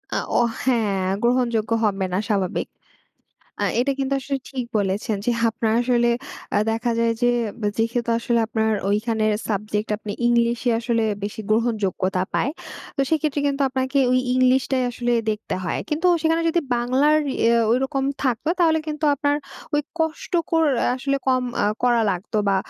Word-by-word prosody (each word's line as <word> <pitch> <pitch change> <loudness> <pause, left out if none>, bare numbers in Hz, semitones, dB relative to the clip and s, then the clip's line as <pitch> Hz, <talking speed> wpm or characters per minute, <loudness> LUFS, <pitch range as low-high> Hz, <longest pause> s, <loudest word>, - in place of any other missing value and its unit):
আ - - +2 0.2
ও - - +5 0.2
হ্যাঁ, 210 -7 +1 0.2
গ্রহণযোগ্য 235 -3 +1
হবে 195 -2 +1
না 190 - +1
স্বাভাবিক। 195 -4 0 1.0
আ - - +3 0.2
এটা 275 +2 +1
কিন্তু 270 0 -1
আসলে 275 +1 -3
ঠিক 255 -3 -3
বলেছেন 200 +2 -1
যে - - +3 0.2
আপনার 225 -1 -1
আসলে 240 -1 +2 0.5
আ - - +5
দেখা 230 +2 -1
যায় 230 0 +2
যে 245 - +5 0.5
যেহেতু 230 +1 0
আসলে 235 0 0
আপনার 220 -1 0 0.2
ওইখানে 220 +1 0 0.2
সাবজেক্ট 210 +1 -2
আপনি 210 -1 -6
ইংলিশ 235 0 +2
এ - - +5
আসলে 230 -1 0 0.2
বেশি 210 +1 -5
গ্রহণযোগ্যতা 205 -5 0
পায়। 275 - +1 0.5
তো - - 0
সেক্ষেত্রে 300 -2 +1
কিন্তু 280 0 0
আপনাকে 260 +2 -1
ওই 255 - +4 0.2
ইংলিশ 255 0 +4
টাই 260 -1 +2
আসলে 240 0 -1 0.2
দেখতে 215 0 -3
হয়। 170 - -1
কিন্তু 320 +4 0 0.2
সেখানে 325 +1 +2
যদি 340 +1 +2 0.2
বাংলার 265 +6 +3 0.2
ইয়ে 235 +1 +3 0.2
ঐরকম 270 +2 0 0.2
থাকত 255 +1 -1
তাহলে 320 -2 +4
কিন্তু 305 0 -3
আপনার 285 +1 +1 0.4
ওই 295 - +3 0.2
কষ্ট 320 +3 -2 0.2
কর 325 -1 +3 0.3
আসলে 275 +1 -1
কম 255 -1 +3 0.2
আ - - +3 0.2
করা 240 -2 +3
লাগতো 195 +4 -2
বা 195 - +3
240 Hz, 160 wpm, -22 LUFS, 220-270 Hz, 1.0 s, ও